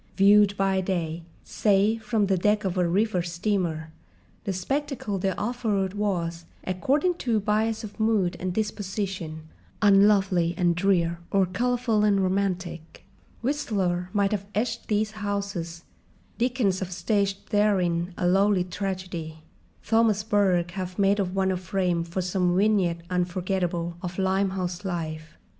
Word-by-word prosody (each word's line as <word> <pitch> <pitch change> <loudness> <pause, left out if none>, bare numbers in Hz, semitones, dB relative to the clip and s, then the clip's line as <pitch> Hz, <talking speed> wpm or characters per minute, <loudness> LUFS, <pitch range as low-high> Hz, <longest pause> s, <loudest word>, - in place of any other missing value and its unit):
Viewed 205 0 +5
by 195 -1 +2
day, 170 -3 -2 0.2
say 210 +2 +2
from 220 -1 0
the 195 -1 +2
deck 210 +4 +2
of 185 -1 -1
a 180 -2 +1
river 195 0 +1
steamer, 170 -2 -2 0.5
the 200 - -1
spectacle 245 +1 -2
they 195 - +1
offered 210 -4 -1
was, 170 -5 -2 0.2
according 275 - +1
to 230 -3 +1
bias 215 +2 0
of 215 0 -9
mood 215 -5 +2
and 185 0 -2
disposition, 190 -5 -3 0.4
unlovely 195 -4 +4
and 175 -2 +3
drear 175 -2 +1
or 195 -1 +3
colourful 235 +3 0
and 205 -2 +3
romantic: 185 -3 -2 0.4
Whistler 195 -10 -1
might 200 0 +1
have 200 -2 -2
etched 225 +4 -2
these 215 0 0
houses, 200 -5 -4 0.6
Dickens 235 -6 +1
have 185 -1 -4
staged 200 +1 -1
therein 185 -5 +1
a - - -1
lowly 195 +1 +3
tragedy, 180 -4 -5 0.4
Thomas 225 -2 +3
Burke 190 -5 +2
have 185 0 -5
made 200 0 +3
of 185 -1 -1
one 190 -1 +2
a 185 - -1
frame 180 -2 -1
for 170 +2 -3
some 180 -1 +1
vignette 190 -5 +2
unforgettable 180 -1 -1
of 180 -1 -5
Limehouse 190 -1 -1
life. 155 -4 -5
190 Hz, 135 wpm, -26 LUFS, 175-210 Hz, 0.6 s, Viewed